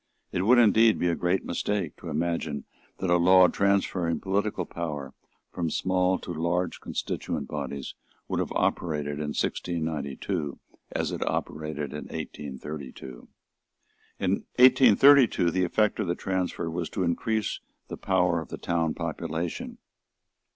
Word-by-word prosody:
It 90 Hz, -, -1 dB
would 120 Hz, +6 st, +5 dB
indeed 115 Hz, -1 st, +5 dB
be 90 Hz, -, +1 dB
a 85 Hz, -, +1 dB
great 90 Hz, +3 st, 0 dB
mistake 95 Hz, -2 st, -2 dB
to -, -, -8 dB
imagine 85 Hz, -3 st, -2 dB, 0.3 s
that 95 Hz, -, -1 dB
a 85 Hz, -, +6 dB
law 90 Hz, +1 st, +7 dB
transferring 95 Hz, -4 st, +1 dB
political 100 Hz, -1 st, -1 dB
power 75 Hz, -6 st, -5 dB, 0.4 s
from 85 Hz, -2 st, -2 dB
small 95 Hz, +2 st, +1 dB
to 90 Hz, -, -7 dB
large 85 Hz, +2 st, -1 dB
constituent -, -, -3 dB
bodies 70 Hz, -2 st, -5 dB, 0.3 s
would -, -, -1 dB
have -, -, -2 dB
operated 75 Hz, -3 st, -1 dB
in 75 Hz, -1 st, -3 dB
1692 80 Hz, -1 st, -2 dB, 0.3 s
as -, -, -1 dB
it -, -, -4 dB
operated 75 Hz, -2 st, -3 dB
in 75 Hz, -, -6 dB
1832. 70 Hz, -2 st, -7 dB, 0.9 s
In -, -, 0 dB, 0.3 s
1832 130 Hz, -5 st, +6 dB
the 95 Hz, +2 st, +1 dB
effect 105 Hz, +5 st, +1 dB
of 105 Hz, -, -1 dB
the 85 Hz, -, 0 dB
transfer 95 Hz, -3 st, -2 dB
was 85 Hz, 0 st, -3 dB
to 95 Hz, -, -2 dB
increase 105 Hz, +5 st, -1 dB, 0.3 s
the -, -, -5 dB
power 90 Hz, -3 st, +1 dB
of 80 Hz, -, -10 dB
the -, -, -5 dB
town 80 Hz, -2 st, -1 dB
population. 80 Hz, +2 st, -4 dB
85 Hz, 135 wpm, -27 LUFS, 75-95 Hz, 0.9 s, law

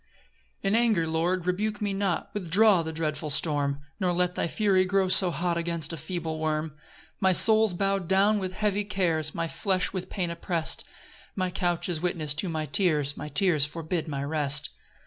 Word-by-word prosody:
1 195 Hz, 0 st, 0 dB
In -, -, +3 dB
anger, 215 Hz, -9 st, +2 dB
Lord, 170 Hz, +3 st, -1 dB
rebuke 210 Hz, +4 st, -1 dB
me 205 Hz, -2 st, -2 dB
not, 195 Hz, -3 st, -2 dB
Withdraw 200 Hz, 0 st, +4 dB
the 160 Hz, 0 st, -5 dB
dreadful 155 Hz, -1 st, -3 dB
storm; 145 Hz, -1 st, 0 dB, 0.2 s
Nor 180 Hz, -3 st, 0 dB
let 180 Hz, 0 st, 0 dB
thy -, -, -2 dB
fury 190 Hz, +1 st, +2 dB
grow 190 Hz, +1 st, +1 dB
so 185 Hz, 0 st, +5 dB
hot 170 Hz, 0 st, -1 dB
Against 170 Hz, -2 st, -2 dB
a -, -, -3 dB
feeble 160 Hz, 0 st, -5 dB
worm. 155 Hz, 0 st, -1 dB
2 150 Hz, -, -23 dB, 0.4 s
My 190 Hz, -1 st, +3 dB
soul's 220 Hz, 0 st, +5 dB
bow'd 195 Hz, -1 st, -1 dB
down 200 Hz, +3 st, +3 dB
with 185 Hz, -1 st, -4 dB
heavy 205 Hz, 0 st, -1 dB
cares, 170 Hz, -7 st, -1 dB
My 165 Hz, 0 st, -2 dB
flesh 185 Hz, +2 st, -1 dB
with 185 Hz, -1 st, -5 dB
pain 180 Hz, -4 st, -3 dB
oppress'd; 170 Hz, -1 st, -2 dB, 0.5 s
My 185 Hz, -2 st, -1 dB
couch 175 Hz, -2 st, -1 dB
is 170 Hz, -4 st, -2 dB
witness 160 Hz, -4 st, 0 dB
to 170 Hz, +5 st, 0 dB
my 155 Hz, -1 st, -3 dB
tears, 150 Hz, -2 st, +1 dB
My -, -, -7 dB
tears 175 Hz, -5 st, +2 dB
forbid 160 Hz, +2 st, -3 dB
my 140 Hz, -2 st, -4 dB
rest. 145 Hz, -1 st, 0 dB
175 Hz, 185 wpm, -26 LUFS, 160-190 Hz, 0.5 s, so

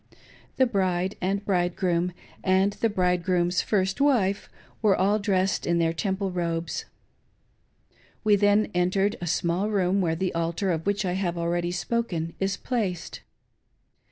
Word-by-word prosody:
Xhe 260 Hz, -2 st, +3 dB
bride 185 Hz, -1 st, 0 dB
and 195 Hz, +2 st, -1 dB
bridegroom, 180 Hz, -1 st, 0 dB, 0.3 s
and 190 Hz, +1 st, +3 dB
the 230 Hz, -, 0 dB
bridegrqom's 180 Hz, -2 st, +1 dB
first 190 Hz, +3 st, 0 dB
wife, 215 Hz, -9 st, +2 dB, 0.3 s
were 210 Hz, -3 st, +4 dB
all 200 Hz, +3 st, +2 dB
dressed 195 Hz, -2 st, 0 dB
in 170 Hz, 0 st, +2 dB
their 165 Hz, -1 st, +2 dB
Temple 190 Hz, +2 st, -2 dB
robes. 170 Hz, -2 st, -2 dB, 1.4 s
We 210 Hz, -2 st, +5 dB
then 205 Hz, +1 st, +3 dB
entered 190 Hz, +3 st, +1 dB
a -, -, -3 dB
§mall 175 Hz, +5 st, 0 dB
room 195 Hz, -1 st, +2 dB
where 165 Hz, -3 st, +1 dB
the 185 Hz, +2 st, -2 dB
altar, 170 Hz, +3 st, -1 dB
of 165 Hz, +2 st, -3 dB
which 200 Hz, 0 st, 0 dB
I 180 Hz, -, 0 dB
have 180 Hz, -2 st, -1 dB
already 170 Hz, +1 st, -1 dB
spoken, 175 Hz, -2 st, -2 dB
is 195 Hz, +1 st, 0 dB
placed. 200 Hz, -9 st, -3 dB
185 Hz, 140 wpm, -26 LUFS, 175-200 Hz, 1.4 s, We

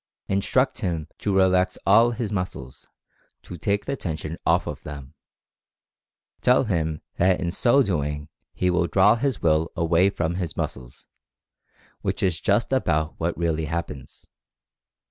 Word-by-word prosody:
Instruct 115 Hz, +7 st, +1 dB
him 85 Hz, -8 st, -2 dB
to 100 Hz, -2 st, -1 dB
relax 95 Hz, -1 st, +3 dB
all 115 Hz, +4 st, +6 dB
of 115 Hz, -, -7 dB
his 115 Hz, -4 st, -3 dB
muscles 90 Hz, -, -5 dB, 0.3 s
— -, -, -41 dB
to 90 Hz, -, -9 dB
take 100 Hz, +5 st, -1 dB
the 140 Hz, -, -2 dB
tension 80 Hz, -, -5 dB
off -, -, +3 dB
of -, -, -6 dB
them. 70 Hz, -3 st, -9 dB, 1.3 s
Tell 125 Hz, +1 st, +4 dB
him 80 Hz, -8 st, -2 dB
that 90 Hz, +1 st, +3 dB
in 85 Hz, -, -2 dB
so 125 Hz, +8 st, +3 dB
doing 75 Hz, -, -2 dB, 0.2 s
he 90 Hz, 0 st, 0 dB
will 90 Hz, -1 st, +1 dB
"draw 95 Hz, +5 st, +5 dB
his 120 Hz, -1 st, -2 dB
Will 80 Hz, 0 st, +2 dB
away 85 Hz, +3 st, +3 dB
from 85 Hz, -3 st, -2 dB
his 90 Hz, -4 st, -4 dB
muscles," 60 Hz, -2 st, -5 dB, 1.0 s
which -, -, -2 dB
is 90 Hz, -4 st, 0 dB
just 105 Hz, +6 st, +1 dB
about 80 Hz, -11 st, 0 dB
what 85 Hz, +1 st, -1 dB
really 80 Hz, -2 st, 0 dB
happens. 75 Hz, -4 st, -6 dB
90 Hz, 150 wpm, -24 LUFS, 80-100 Hz, 1.3 s, all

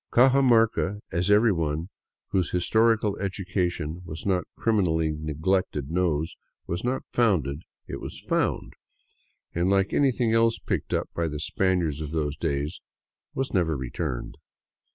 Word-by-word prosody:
Cajamarca, 120 Hz, -6 st, +4 dB
as 90 Hz, +3 st, 0 dB
everyone 85 Hz, -7 st, +2 dB, 0.4 s
whose 90 Hz, -5 st, +1 dB
historical 110 Hz, +3 st, +2 dB
education 90 Hz, -4 st, -2 dB
was 80 Hz, -2 st, -7 dB
not 95 Hz, -2 st, +1 dB
crimi 110 Hz, -3 st, +2 dB
nally 80 Hz, -2 st, +1 dB
neglected 75 Hz, 0 st, -1 dB
knows, 85 Hz, -3 st, 0 dB, 0.3 s
was 85 Hz, +2 st, -3 dB
not 125 Hz, +2 st, -1 dB
founded; 85 Hz, -, +2 dB, 0.3 s
it -, -, -6 dB
was -, -, -7 dB
found; -, -, -1 dB, 0.8 s
and 85 Hz, +2 st, +1 dB
like 95 Hz, 0 st, +2 dB
any 140 Hz, -2 st, +4 dB
thing 115 Hz, -2 st, 0 dB
else 115 Hz, 0 st, +3 dB
picked -, -, -3 dB
up -, -, 0 dB
by 85 Hz, -1 st, 0 dB
the 75 Hz, -1 st, -4 dB
Spaniards 85 Hz, -2 st, 0 dB
of 75 Hz, -, -4 dB
those 75 Hz, -2 st, -1 dB
days, 75 Hz, -1 st, -2 dB, 0.5 s
was 135 Hz, 0 st, -2 dB
never 80 Hz, -6 st, +1 dB
re 65 Hz, -2 st, -5 dB
turned. -, -, -4 dB
90 Hz, 140 wpm, -26 LUFS, 80-105 Hz, 0.8 s, Cajamarca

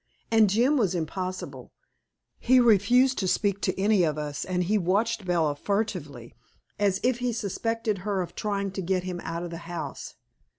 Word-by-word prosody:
And 220 Hz, -2 st, +5 dB
Jim 245 Hz, +9 st, +3 dB
was 200 Hz, -8 st, +1 dB
impossible. 185 Hz, +3 st, -5 dB, 0.7 s
He 255 Hz, +1 st, +4 dB
refused 245 Hz, +3 st, +4 dB
to 190 Hz, -, -1 dB
speak 200 Hz, +1 st, 0 dB
to 185 Hz, -, -1 dB
any 205 Hz, 0 st, +3 dB
of 155 Hz, -2 st, 0 dB
us 150 Hz, -1 st, -4 dB
and 180 Hz, -1 st, -1 dB
he 200 Hz, +5 st, 0 dB
watched 205 Hz, +3 st, 0 dB
Bella 165 Hz, -5 st, +1 dB
furtively, 150 Hz, -, -3 dB, 0.5 s
as 200 Hz, -2 st, +2 dB
if 250 Hz, -1 st, +1 dB
he 245 Hz, 0 st, 0 dB
suspected 225 Hz, 0 st, -2 dB
her 195 Hz, 0 st, -1 dB
of 170 Hz, -, -10 dB
trying 200 Hz, -2 st, -2 dB
to 190 Hz, -, -4 dB
get 185 Hz, 0 st, 0 dB
him 180 Hz, -1 st, -4 dB
out 165 Hz, +1 st, -4 dB
of 175 Hz, -, -6 dB
the 165 Hz, -, -5 dB
house. 175 Hz, -1 st, -6 dB
195 Hz, 175 wpm, -26 LUFS, 175-220 Hz, 0.7 s, And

